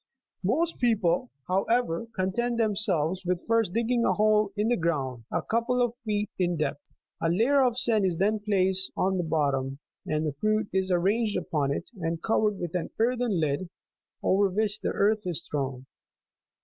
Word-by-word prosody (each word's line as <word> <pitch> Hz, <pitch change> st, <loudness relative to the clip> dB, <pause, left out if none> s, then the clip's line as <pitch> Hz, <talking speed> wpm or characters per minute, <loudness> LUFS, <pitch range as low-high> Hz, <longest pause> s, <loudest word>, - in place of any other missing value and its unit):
Most 315 Hz, -, 0 dB
people, 220 Hz, -2 st, +1 dB, 0.2 s
however, 195 Hz, +1 st, 0 dB
content 230 Hz, +6 st, -1 dB
themselves 190 Hz, -6 st, +1 dB
with 180 Hz, -1 st, -2 dB
first 230 Hz, -4 st, +2 dB
digging 235 Hz, +3 st, +1 dB
a -, -, +3 dB
hole 210 Hz, -1 st, +3 dB
in 210 Hz, +2 st, +1 dB
the 245 Hz, -, +3 dB
ground, 135 Hz, -, -2 dB
a -, -, -1 dB
couple 235 Hz, +2 st, 0 dB
of 245 Hz, -2 st, +1 dB
feet 210 Hz, -2 st, -1 dB
in 175 Hz, -2 st, +1 dB
depth; 150 Hz, -2 st, -3 dB, 0.3 s
a 165 Hz, -, +1 dB
layer 235 Hz, +11 st, +3 dB
of 245 Hz, -2 st, +1 dB
sand 225 Hz, -4 st, +3 dB
is 175 Hz, -3 st, 0 dB
then 210 Hz, +4 st, +1 dB
placed 190 Hz, -2 st, +2 dB
at 190 Hz, +1 st, +1 dB
the 180 Hz, -, 0 dB
bottom, 140 Hz, -4 st, 0 dB, 0.3 s
and 155 Hz, 0 st, 0 dB
the 150 Hz, -, -2 dB
fruit 215 Hz, +8 st, 0 dB
is 190 Hz, 0 st, 0 dB
arranged 205 Hz, +5 st, +1 dB
upon 145 Hz, -3 st, -1 dB
it, 165 Hz, -, -4 dB
and 165 Hz, -1 st, -3 dB
covered 215 Hz, -2 st, +1 dB
with 175 Hz, -3 st, -5 dB
an 180 Hz, -2 st, -2 dB
earthen 235 Hz, -4 st, +1 dB
lid, 155 Hz, +3 st, -1 dB, 0.5 s
over 195 Hz, +1 st, +3 dB
which 210 Hz, +2 st, -1 dB
the -, -, -2 dB
earth 210 Hz, 0 st, +1 dB
is 175 Hz, -4 st, -4 dB
thrown. 135 Hz, -3 st, -3 dB
195 Hz, 175 wpm, -27 LUFS, 170-225 Hz, 0.5 s, a